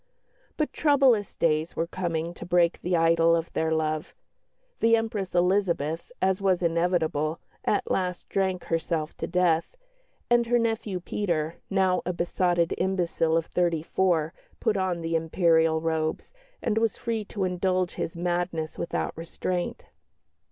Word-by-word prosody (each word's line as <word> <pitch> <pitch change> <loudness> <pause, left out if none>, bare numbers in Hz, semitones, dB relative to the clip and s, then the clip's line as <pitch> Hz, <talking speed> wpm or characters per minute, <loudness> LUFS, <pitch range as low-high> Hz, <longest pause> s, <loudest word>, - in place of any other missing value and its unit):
But 305 - -1
troublous 270 -8 +3
days 155 0 +1
were 165 - 0
coming 170 -1 -3
to - - -9
break 175 -1 +2
the 175 0 +1
idyll 165 0 +4
of 165 0 -3
their 160 0 0
love. 155 -1 -1 0.6
The 230 0 +5
Empress 220 -5 -2
Elizabeth, 175 -2 +1
as 190 0 +1
was 185 -2 +2
inevitable, 165 -2 +1 0.3
at 205 - 0
last 180 -1 -1
drank 190 -2 -1
herself 165 -1 -2
to - - -3
death, 175 - +1 0.5
and 240 -1 +3
her 240 +1 +3
nephew 225 -5 -1
Peter, 170 -5 -2
now 190 -2 +2
a 180 - -2
besotted 175 0 +1
imbecile 175 -3 +1
of 165 - 0
thirty 170 -3 0
four, 170 -3 +1 0.3
put 220 -3 +1
on 185 -3 -1
the 165 0 -1
Imperial 160 -1 +3
robes, 160 - -2 0.3
and 225 -3 +1
was 225 -1 0
free 230 -2 -2
to 200 -1 -4
indulge 185 0 0
his 170 - -4
madness 175 -2 -2
without 170 - -2
restraint. 175 +2 -4
175 Hz, 145 wpm, -26 LUFS, 165-190 Hz, 0.6 s, The